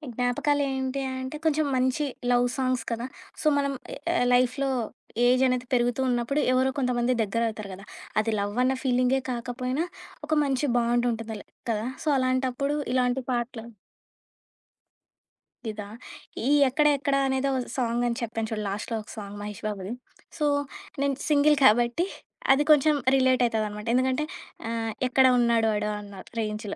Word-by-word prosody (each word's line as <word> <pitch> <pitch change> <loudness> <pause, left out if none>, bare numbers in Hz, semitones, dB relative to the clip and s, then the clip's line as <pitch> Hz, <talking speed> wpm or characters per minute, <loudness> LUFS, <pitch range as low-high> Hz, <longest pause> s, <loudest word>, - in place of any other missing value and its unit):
జ్ఞాపకాలేంటి 265 +2 0 0.2
అంటే, 260 +3 -5
కొంచెం 310 -1 +2
మంచి 260 +3 +1 0.3
లవ్ 245 0 +4
సాంగ్స్ 255 -2 0
కదా! 230 +1 -2 0.4
సో 310 - +1
మనం 280 -1 0 0.5
ఎ - - +1
లైఫ్‌లో 255 +2 +2 0.6
ఏజనేది 255 0 +3
పెరుగుతూ 245 +1 +2
ఉన్నప్పుడు 245 +4 0
ఎవరో 260 +1 +3
కొంతమంది 250 -1 +1
దగ్గరవుతారు 215 -1 -2
కదా! 195 +2 -10 0.4
అది 220 +1 -1
లవ్వన్న 245 +6 +1
ఫీలింగే 255 0 +2
కాకపోయినా, 250 +5 -2 0.4
ఒక 310 - 0
మంచి 275 +1 0
బాండుంటుంది. 235 -2 0
ల్ - - -18 0.3
కదా! 220 +2 -1 0.2
సో - - -8
అలాంటప్పుడు 260 +2 0 0.2
ఇలాంటి 250 0 +1
పాటలు 240 -1 -3 2.0
ఇదా 210 -1 -7 0.6
ఈ - - +3 0.2
'ఎక్కడ 300 +4 +3
ఎక్కడ' 275 0 0
అనేదో 265 +1 0 0.3
సాంగ్ 240 -1 0
అని 235 -1 -1
చెప్పాను 225 -1 -2
చూడు 215 -1 -2
లాస్ట్‌లో 210 +4 -3
ఒక 210 - -16
సాంగ్ 205 -1 -7
'మహేష్ 210 +1 -7
బాబుది'. 200 +1 -4 0.4
సో 300 - 0 0.6
నేను 280 -1 +1
సింగిల్ 295 0 +4
కాబట్టి, 240 - +4 0.5
అది 290 - +2
కొంచెం 300 +1 +5 0.2
రిలేటయితదనమాట 230 -5 +1
ఎందుకంటే, 260 +3 +1 0.4
ఆహ్, 225 -1 -2 0.2
ఎక్కడ 265 +1 +5
ఉన్నాడు 235 -2 +3
వాడు? 210 0 -1
అన్నా 200 -2 -10 0.2
రేంజ్‌లో. 210 -1 -4
245 Hz, 130 wpm, -26 LUFS, 225-265 Hz, 2.0 s, కొంచెం